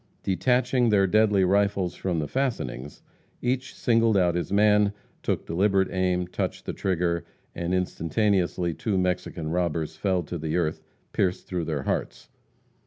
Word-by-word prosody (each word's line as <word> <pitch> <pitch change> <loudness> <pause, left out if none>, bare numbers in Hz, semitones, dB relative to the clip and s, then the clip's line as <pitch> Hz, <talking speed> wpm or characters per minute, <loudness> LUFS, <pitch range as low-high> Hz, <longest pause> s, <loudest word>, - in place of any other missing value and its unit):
Detaching 125 +6 +2
their 100 -2 +4
deadly 105 0 +3
rifles 100 -1 +2
from 90 -2 -2
the 75 -2 -1
fastenings, 75 - -3 0.4
each 130 +1 -2
singled 115 -3 +3
out 90 -2 +3
his 85 +2 -3
man, 105 0 +4 0.3
took - - -1
deliberate 95 +2 +2
aim, 90 -1 0
touched 90 - -4
the - - -3
trigger, 85 -2 0 0.3
and 85 0 -3
instantaneously 90 0 0
two 100 +3 -1
Mexican 90 -3 -1
robbers 80 -3 -1
fell 95 -2 0
to 85 +2 -5
the 80 +2 -1
earth 80 -3 -1 0.3
pierced 90 -2 0
through 90 -3 -3
their 75 -4 -2
hearts. - - -3
90 Hz, 145 wpm, -26 LUFS, 85-105 Hz, 0.4 s, their